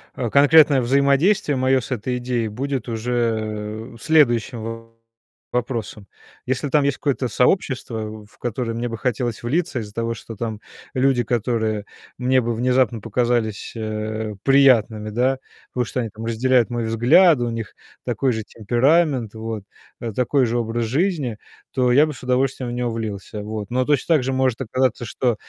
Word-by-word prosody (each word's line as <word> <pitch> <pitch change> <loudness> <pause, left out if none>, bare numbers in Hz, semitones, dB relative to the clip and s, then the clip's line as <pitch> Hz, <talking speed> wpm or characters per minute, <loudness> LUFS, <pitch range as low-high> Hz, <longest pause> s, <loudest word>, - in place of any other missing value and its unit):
э, 120 -3 -2
конкретное 145 0 +6
взаимодействие 140 - +3
моё 130 0 +3
с 125 - -9
этой 125 +1 -2
идеей 120 -2 -2
будет 130 +2 -3
уже 110 -1 -2
следующим 115 -6 +1 0.6
вопросом. 115 -4 -3 0.4
Если 130 +3 -1
там 145 0 +3
есть 140 -1 +1
какое-то 135 -3 -1
сообщество, 115 - -1
в 105 - -23
которое 120 0 -3
мне 120 +1 -2
бы 115 - -5
хотелось 120 -1 -2
влиться 145 +2 -1
из-за 105 -2 -8
того, 115 0 -2
что 115 0 -9
там 110 -1 -4 0.3
люди, 130 -1 +2
которые 110 -3 -1 0.3
мне 130 +1 +2
бы 120 0 -2
внезапно 125 -1 +1
показались, 115 -1 -1
э, 110 0 -4
приятными, 120 -6 +4
да. 130 +4 +1 0.3
Потому 125 -1 0
что 125 - -4
они 115 - -3
там 110 +2 -10
разделяют 120 +1 +2
мой 120 -2 -2
взгляд, 125 +9 +5
у 120 -1 -1
них 115 -2 -5 0.3
такой 135 -2 0
же 110 -1 -3
темперамент, 125 +3 +1
вот, 110 -2 -5 0.4
да, 115 -3 -5
такой 130 +2 +2
же 120 +1 -1
образ 115 0 -1
жизни. 140 - 0 0.4
То 125 -1 +2
я 145 +5 +6
бы 155 - -4
с 130 - -13
удовольствием 130 0 0
в - - -5
него 120 0 -1
влился, 105 -2 -5
вот. 105 -1 -5
Но 125 +1 +1
точно 150 +3 +2
так 145 - +1
же 135 - -1
может 130 -2 +1
оказаться, 130 0 0
что 120 +1 0
120 Hz, 160 wpm, -22 LUFS, 110-130 Hz, 0.6 s, конкретное